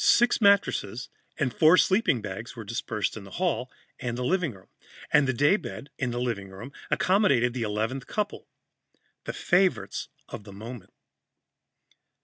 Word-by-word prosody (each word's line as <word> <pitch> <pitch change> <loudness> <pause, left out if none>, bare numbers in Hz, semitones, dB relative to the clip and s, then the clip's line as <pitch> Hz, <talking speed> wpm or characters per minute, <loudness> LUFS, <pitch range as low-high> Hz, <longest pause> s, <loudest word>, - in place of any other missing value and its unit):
Six 240 0 +4
mattresses 165 - +2 0.3
and 130 -6 0
four 160 +3 +6
sleeping 190 - +3
bags 105 +4 -6
were 115 - -7
dispersed 110 -1 -2
in 110 - -8
the 100 - -11
hallway 170 -8 0 0.3
and 120 -2 -3
living 165 +3 0
room, 95 -1 -18 0.4
and 145 -2 +5
the - - +3
daybed, 145 - 0
in 130 - 0
the 120 0 -3
living 115 -6 -2
room, 105 +9 -10 0.2
accommodated 140 - +3
the 125 - -3
eleventh 110 +4 -2
couple, 210 -1 -3 0.8
the - - -3
favorites 185 +1 +1 0.2
of - - -8
the 100 -1 -11
moment. 110 0 -9
125 Hz, 145 wpm, -27 LUFS, 110-175 Hz, 0.8 s, four